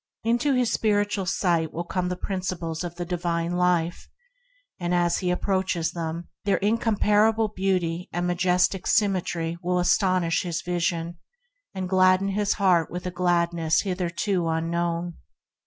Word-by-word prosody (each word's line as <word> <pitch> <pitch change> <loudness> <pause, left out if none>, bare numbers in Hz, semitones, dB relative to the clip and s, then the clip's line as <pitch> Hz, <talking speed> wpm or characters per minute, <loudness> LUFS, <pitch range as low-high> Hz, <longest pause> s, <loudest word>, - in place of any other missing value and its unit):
Into 240 +5 +2
his 250 -2 +1
spiritual 205 -3 0
ken 170 -4 +1
will 170 - -4
come 180 +1 -2
the 180 - -2
Principles 180 -4 -4
of 175 -1 -6
the 175 - -4
divine 170 -1 -2
Life, 175 -1 0 0.7
and 175 0 0
as 175 -1 +2
he 180 - -1
approaches 180 -2 0
them 170 0 -5 0.2
their 200 -1 +2
incomparable 215 0 +2
beauty 185 -3 -1
and 175 +1 -2
majestic 180 +1 +1
symmetry 175 -5 0
will 180 0 0
astonish 180 -1 +2
his 170 -3 -3
vision 170 -1 -2 0.6
and 185 -1 -3
glad 185 0 +4
den 195 +1 -2
his 205 +1 +1
heart 180 -5 +2
with 180 +1 -6
a 180 - -2
gladness 170 -2 +1
hitherto 180 -1 -1
unknown. 170 +1 -1
180 Hz, 140 wpm, -25 LUFS, 170-190 Hz, 0.7 s, glad